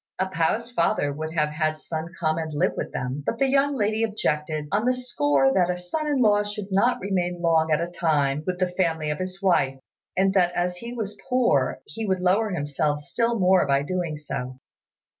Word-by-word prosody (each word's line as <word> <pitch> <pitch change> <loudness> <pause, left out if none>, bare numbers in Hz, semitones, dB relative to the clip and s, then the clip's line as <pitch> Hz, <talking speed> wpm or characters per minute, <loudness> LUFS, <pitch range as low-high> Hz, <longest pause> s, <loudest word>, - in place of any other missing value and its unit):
A 190 - 0
pao's 200 +7 0
father 155 -8 +1
would 155 +2 -5
have 150 -2 +2
had 155 0 -1
Sun 165 +2 -5
come 160 -1 +1
and 160 -1 -4
live - - +2
with - - -4
them; 130 +3 -3
but 230 - -2
the 275 - +3
young 275 +1 +2
lady 215 -2 0
objected, 155 -8 -1
on 210 +3 +1
the 255 0 +3
score 145 - +2
that 180 -2 +3
a 180 - 0
son 180 - -3
in 290 -2 +1
law 205 -1 +4
should 205 -1 -5
not 200 +6 +3
remain 180 -2 -1
long 165 -2 +2
at 150 - +3
a - - 0
time 150 -5 0
with 180 -1 -1
the 180 -1 0
family 160 -4 0
of 150 - -4
his 185 +1 -5
wife, 135 -8 +2 0.4
and 190 0 +3
that 180 -2 +3
as 180 0 -1
he 235 +6 -7
was 220 -4 -4
poor 235 - +2
he 220 +8 -5
would 190 -1 +1
lower 200 +5 +2
himself 145 -3 -1
still 230 +9 0
more 185 -4 +4
by 140 0 +2
doing 170 -1 -2
so. 130 -3 -6
180 Hz, 210 wpm, -25 LUFS, 155-205 Hz, 0.4 s, law